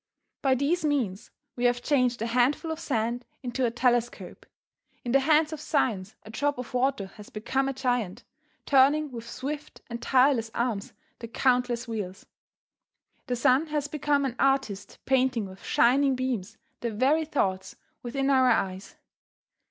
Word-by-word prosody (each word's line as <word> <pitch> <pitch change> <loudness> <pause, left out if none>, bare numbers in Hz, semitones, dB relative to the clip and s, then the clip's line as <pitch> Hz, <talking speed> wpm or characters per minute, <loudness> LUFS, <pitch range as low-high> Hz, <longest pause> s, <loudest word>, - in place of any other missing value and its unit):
By 265 -2 +3
these 295 +7 0
means 250 -11 -1 0.3
we 245 - -1
have 245 0 +2
changed 250 -6 +1
a - - -1
handful 250 +7 +1
of 320 - -4
sand 240 -4 -1 0.2
into 250 0 0
a - - +1
telescope. 240 0 -1 0.6
In 240 - -1
the 275 - +5
hands 310 +2 +3
of 305 - -6
science 220 -11 -1
a 215 - -11
drop 285 +4 -1
of 250 0 -7
water 250 -4 +1
has 210 - -11
become 265 +5 -1
a - - -2
giant, 245 -7 -2 0.4
turning 285 +2 +4
with 235 -1 -8
swift 295 +4 -6
and 235 0 -5
tireless 255 -3 +3
arm 235 -3 0 0.4
the 230 - -7
countless 245 0 +1
wheels. 205 -5 -5 1.0
The 250 - 0
sun 255 +6 +3
has 295 -1 -2
become 290 -1 0
an 250 -3 -3
artist 270 -8 0
painting 260 -4 +2
with 190 -1 -11
shining 270 +2 +3
beams 235 -5 -3 0.2
the 235 - -2
very 265 +9 +2
thoughts 190 -12 -2 0.3
within 270 +3 -1
our 260 -2 +5
eyes. 190 -4 -1
250 Hz, 155 wpm, -27 LUFS, 230-275 Hz, 1.0 s, the